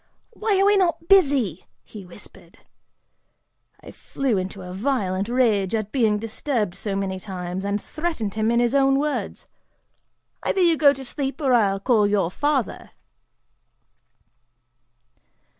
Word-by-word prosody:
'Why 415 -4 0
are 390 - +4
we 410 0 +4
not 340 -3 0
busy,' 275 - +3 0.2
he 200 -4 -11
whispered! 180 +4 -12 1.2
I - - -11
flew 270 -5 -2
into 190 0 -4
a 180 0 -8
violent 200 -3 -1
rage 225 -6 +1
at 215 -1 -3
being 225 -6 +2
disturbed 225 - -2
so 200 +1 -4
many 190 -1 -3
times, 185 -1 -6
and 200 +1 -1
threatened 305 - -4
him 220 0 0
in 235 0 +2
his 240 0 +1
own 270 -1 +3
words, 295 +1 -3 1.0
'Either - - -1
you 340 -2 +4
go 290 -2 +5
to 270 -1 -7
sleep, 275 +3 -4
or 270 -4 +1
I'll 200 -5 +2
call 205 -5 +2
father! 290 -1 -2
225 Hz, 135 wpm, -23 LUFS, 195-280 Hz, 1.2 s, go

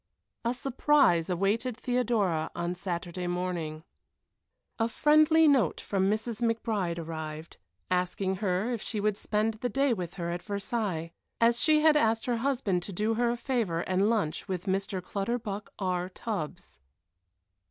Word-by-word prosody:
A 235 +1 0
surprise 270 - +3
awaited 210 +7 0
Theodora 230 -11 0
on 170 +1 -2
Saturday 180 -1 -4
morning. 175 -3 -3 1.0
A 225 +1 +2
friendly 310 +4 +5
note 260 - +3
from 195 -1 0
Mrs. 220 +2 -2
McBride 220 -7 0
arrived, 160 -1 -6 0.3
asking 185 +1 0
her 200 +4 0
if 230 - -3
she 215 - -3
would 210 0 +1
spend 215 +2 0
the 235 +3 -3
day 275 -1 +2
with 180 -4 -5
her 170 -2 -3
at 175 +1 -3
Versailles, 200 -5 -2 0.3
as 235 +1 +3
she 310 -1 +4
had 310 -1 +6
asked 225 -5 +2
her 245 -2 0
husband 230 -8 0
to 200 - -7
do 210 +4 0
her 240 +1 +1
a 240 - -1
favor 230 -10 -1
and 190 +4 +1
lunch 200 -10 -1
with 185 -2 -3
Mr. 195 -1 -1
Clutterbuck 205 +1 -3
R. 180 -2 -1
Tubbs. 190 - -5
205 Hz, 150 wpm, -29 LUFS, 180-235 Hz, 1.0 s, had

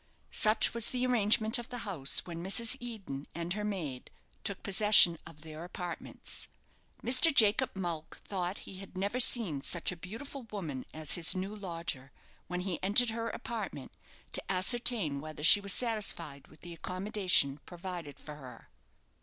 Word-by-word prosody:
Such 215 +1 +3
was 235 -1 +1
the 250 0 -1
arrangement 220 -1 +3
of 240 - -9
the 245 - -6
house 160 -9 +3
when 170 -1 -7
Mrs. 225 +6 +2
Eden 200 - -8
and 170 +1 -3
her 210 +1 -5
maid 165 -12 -5 0.3
took 200 - -5
possession 200 -4 +5
of 155 -2 -14
their 155 0 -10
apartments. 175 0 -3 0.6
Mr. 260 +7 +6
Jacob 230 -1 +3
Mulck 170 -4 -5
thought 185 -1 -4
he 190 - -10
had 195 -1 -12
never 200 +6 -2
seen 205 - +3
such 175 +5 -1
a - - -7
beautiful 230 +11 -9
woman 155 -11 -6
as 155 -2 -2
his 175 0 +4
new 190 +3 -5
lodger, 165 -9 -6 0.4
when 180 0 -4
he 180 -3 -4
entered 220 +5 +4
her 230 0 -4
apartment, 215 - -7 0.4
to - - 0
ascertain 190 - +2
whether 155 -1 -9
she 205 +5 +7
was 200 0 -1
satisfied 210 - 0
with - - -20
the 175 0 -10
accommodation 185 -5 +1
provided 175 -5 -8
for 150 -1 -10
her. 130 -4 -13
185 Hz, 160 wpm, -30 LUFS, 165-215 Hz, 0.6 s, she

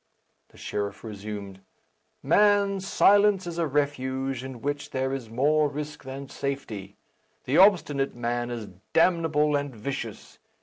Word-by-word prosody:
The - - -20
sheriff 100 -1 -4
resumed, 100 -2 -7 0.6
"Man, 205 -1 +4
silence 200 0 +4
is 170 -1 -5
a 165 - +1
refuge 135 -2 -1
in 130 -2 -7
which 145 0 -3
there 130 0 -1
is 130 -5 -5
more 145 +6 +2
risk 150 +1 -6
than 135 +1 -7
safety. 115 -9 -5 0.5
The 135 - +2
obstinate 160 -8 +4
man 120 0 -2
is 115 -4 -5 0.2
damnable 160 -4 +3
and 140 -3 -2
vicious. 115 -1 -6
140 Hz, 130 wpm, -26 LUFS, 120-155 Hz, 0.6 s, Man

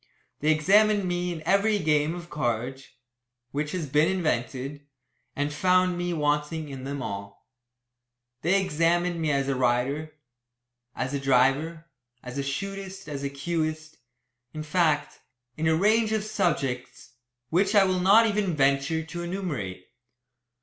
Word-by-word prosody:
They 155 +2 +2
examined 200 +6 +4
me 175 0 -1
in 160 -2 -6
every 205 +2 +3
game 155 -2 +1
of 175 -1 -8
cards 130 0 -2 0.6
which 145 +1 -2
has 180 -4 -2
been 150 +4 +3
invented 145 -4 -2 0.5
and 145 +1 -1
found 185 +2 +3
me 175 0 -2
wanting 150 0 -1
in 135 -1 -7
them 140 0 -4
all. 100 -1 -7 1.0
They 185 +5 +3
examined 175 0 +1
me 155 -2 +1
as 135 -1 0
a 140 - +1
rider, 130 +5 0 0.8
as 130 +1 -3
a 140 - -1
driver, 135 +5 +2 0.4
as 125 +2 -6
a - - -1
shootist, 195 +5 -5
as 145 -2 -5
a 140 - -2
cueist, 155 +2 -3 0.6
in 155 - -4
fact, 155 -2 +1 0.4
in 160 +1 -1
a 160 - +4
range 215 +5 +3
of 215 -1 0
subjects 135 - -2 0.4
which 195 +5 +2
I 200 - +7
will 185 -1 +1
not 200 +5 +6
even 205 -5 0
venture 140 +3 +2
to 175 +2 -7
enumerate. 150 - -4
155 Hz, 145 wpm, -26 LUFS, 140-180 Hz, 1.0 s, I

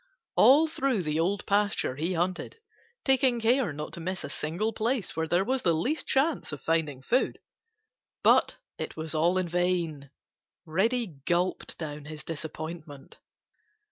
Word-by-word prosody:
All 295 +5 +7
through 265 - 0
the 155 0 -1
Old 195 +5 0
Pasture 205 -9 +1
he 165 +6 -1
hunted, 180 - -2 0.5
taking 265 -2 +3
care 235 -2 +2
not 150 +1 -6
to - - -6
miss 185 +3 -4
a 145 - -6
single 175 +11 -2
place 225 -2 -1
where 160 0 -1
there 175 +3 +2
was 260 +2 0
the 170 -2 +2
least 265 - -1
chance 280 - +1
of 150 - -5
finding 150 -5 -1
food. 255 - +1 0.9
But - - +4 0.2
it - - -5
was 160 0 -4
all 170 +4 +2
in 185 -1 0
vain. 170 -5 -1 0.6
Reddy 225 +9 +1 0.2
gulped 175 +1 0
down 150 -2 -6
his 155 0 -8
disappointment. 155 -2 -7
175 Hz, 150 wpm, -28 LUFS, 155-225 Hz, 0.9 s, All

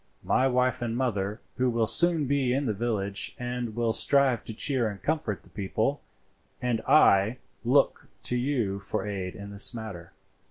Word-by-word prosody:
My 130 - +2
wife 125 0 +1
and 120 -1 -2
mother 105 -4 -2 0.2
will 120 -3 +2
soon 170 +4 +5
be 135 -1 +1
down 125 - +2
in 140 - -1
the 110 - 0
village 100 -3 -2
and 125 -2 -4
will 115 -1 0
strive 135 -1 +2
to 110 - -5
cheer 125 -2 0
and 100 -2 -8
comfort 150 - -2
the - - -20
people, 110 +7 -2 0.6
and 120 -2 -1
I 110 -5 +5 0.3
look 135 +4 +2 0.2
to 125 - 0
you 120 -6 -1
for 100 - -4
aid 95 -2 -4
in 100 -1 -9
this 100 +4 +1
matter." 100 -7 -8
120 Hz, 170 wpm, -27 LUFS, 105-130 Hz, 0.6 s, soon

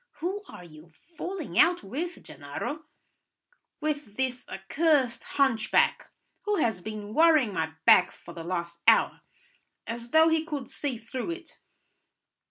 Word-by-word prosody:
"Who 370 +6 -3
are - - -11
you 155 -1 -15 0.3
falling 360 -2 -4
out 350 +1 +5
with, 320 - -5
Gennaro?" 165 - -6 1.0
"With 290 -8 -3
this 255 -1 -2
accursed 265 - +1
hunchback, 265 -6 +2 0.4
who 415 0 +1
has 220 - 0
been 210 +1 -7
worrying 310 -8 +5
my 160 -2 -2
back 180 - +7
for - - -13
the 165 - -7
last 170 -1 -4
hour, 225 - +5 0.6
as 235 +1 -6
though 320 +4 +6
he 320 -1 +2
could 295 -6 -5
see 275 -5 -2
through 245 +6 -5
it." 335 0 -8
260 Hz, 135 wpm, -28 LUFS, 205-320 Hz, 1.0 s, back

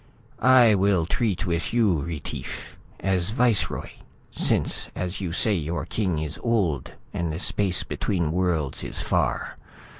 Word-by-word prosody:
"I 125 -2 +7
will 95 -4 +3
treat 105 +2 0
with 85 +5 -1
you, 105 -9 +3
Retief, 80 -1 -6 0.3
as 95 -2 +1
viceroy, 120 -2 +1 0.4
since - - 0
as 90 +2 -3
you 90 -3 -2
say 105 +5 +2
your 85 -2 -2
king 95 -7 -1
is 75 0 -4
old 95 - 0 0.2
and 85 -2 -1
the 80 - -3
space 95 0 +1
between 85 -6 -1
worlds 85 -6 0
is - - -3
far. - - 0
90 Hz, 140 wpm, -25 LUFS, 85-105 Hz, 0.4 s, I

